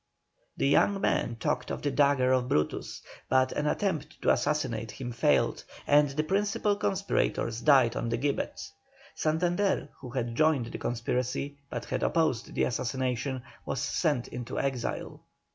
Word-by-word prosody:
The -, -, +2 dB
young 195 Hz, +8 st, +3 dB
men 120 Hz, -, 0 dB
talked 125 Hz, +2 st, -2 dB
of -, -, -4 dB
the 145 Hz, -, +1 dB
dagger 140 Hz, -3 st, +3 dB
of 130 Hz, -1 st, +2 dB
Brutus, 75 Hz, -, -1 dB, 0.3 s
but 130 Hz, 0 st, +3 dB
an 150 Hz, -, -1 dB
attempt 160 Hz, -4 st, -1 dB
to -, -, +5 dB
assassinate 120 Hz, -7 st, 0 dB
him 120 Hz, +2 st, -6 dB
failed, 95 Hz, -, +2 dB, 0.2 s
and 145 Hz, 0 st, +5 dB
the 145 Hz, +3 st, -1 dB
principal 205 Hz, +3 st, +1 dB
conspirators 195 Hz, -, 0 dB
died 130 Hz, -5 st, +5 dB
on 115 Hz, -, -2 dB
the 115 Hz, -, 0 dB
gibbet. 140 Hz, +3 st, -2 dB, 0.5 s
Santander, 175 Hz, +1 st, 0 dB
who 130 Hz, -, -8 dB
had 120 Hz, -2 st, -2 dB
joined 155 Hz, -2 st, +3 dB
the -, -, -6 dB
conspiracy 125 Hz, +4 st, -2 dB
but -, -, -4 dB
had -, -, -2 dB
opposed 155 Hz, -8 st, 0 dB
the -, -, +2 dB
assassination, 130 Hz, +1 st, -1 dB, 0.2 s
was 135 Hz, -, -3 dB
sent 140 Hz, -2 st, 0 dB
into 125 Hz, -1 st, -6 dB
exile. 135 Hz, -3 st, -3 dB
135 Hz, 150 wpm, -29 LUFS, 120-155 Hz, 0.5 s, to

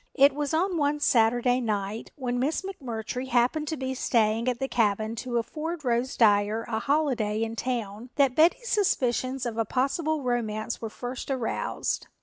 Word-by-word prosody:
It 275 Hz, +1 st, +6 dB
was 290 Hz, 0 st, -2 dB
on 355 Hz, +3 st, +1 dB
one 290 Hz, 0 st, +1 dB
Saturday 245 Hz, -1 st, +3 dB
night, 210 Hz, -1 st, -2 dB
when 245 Hz, -3 st, -2 dB
Miss 295 Hz, +9 st, 0 dB
McMurtry 250 Hz, -, -5 dB
happened 255 Hz, +5 st, +1 dB
to 315 Hz, 0 st, -2 dB
be 260 Hz, 0 st, -3 dB
staying 225 Hz, -2 st, +1 dB
at 250 Hz, -1 st, +1 dB
the 270 Hz, -, -2 dB
cabin 220 Hz, -2 st, +1 dB
to 240 Hz, +1 st, -2 dB
afford 305 Hz, +6 st, -4 dB
Rose 245 Hz, +2 st, 0 dB
Dyer 210 Hz, 0 st, +3 dB
a 220 Hz, -2 st, -1 dB
holiday 245 Hz, -7 st, +1 dB
in 225 Hz, 0 st, -3 dB
town, 230 Hz, -2 st, -3 dB
that 275 Hz, -3 st, +3 dB
Betty's 345 Hz, -, +3 dB
suspicions 260 Hz, -, +1 dB
of 230 Hz, -1 st, -3 dB
a -, -, +3 dB
possible 280 Hz, -, 0 dB
romance 230 Hz, -3 st, -2 dB
were 225 Hz, -, -4 dB
first 245 Hz, +5 st, -6 dB
aroused. 260 Hz, -4 st, -2 dB
245 Hz, 165 wpm, -27 LUFS, 225-280 Hz, -, It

